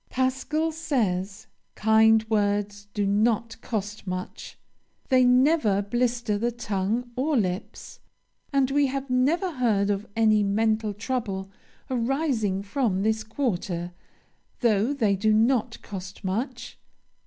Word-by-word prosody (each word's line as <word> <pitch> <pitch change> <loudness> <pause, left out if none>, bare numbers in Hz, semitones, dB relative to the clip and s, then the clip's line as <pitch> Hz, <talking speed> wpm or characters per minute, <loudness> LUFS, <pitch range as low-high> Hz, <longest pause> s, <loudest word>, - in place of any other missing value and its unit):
Pascal 265 +5 0
says: 210 - -2 0.3
"Kind 220 0 +4
words 205 -1 0
do 205 -1 +1
not 225 +3 +1
cost 210 -2 -4
much. 185 0 -6 0.5
They 255 -2 +5
never 250 -5 +3
blister 235 0 0
the 240 +2 0
tongue 225 +1 -2
or 285 +3 +1
lips. 185 -2 -3 0.5
And 275 -2 +2
we 285 0 +3
have 270 0 -4
never 315 +9 +2
heard 220 -8 +1
of 200 +1 -3
any 215 -2 +4
mental 215 +1 +1
trouble 210 -4 -3 0.4
arising 240 -6 0
from 200 -3 0
this 220 0 +1
quarter. 190 -7 -2 0.7
Though 225 0 +2
they 220 -8 +1
do 215 +3 +1
not 230 +1 +2
cost 190 -1 -8
much. 235 +6 -4
220 Hz, 120 wpm, -26 LUFS, 205-255 Hz, 0.7 s, They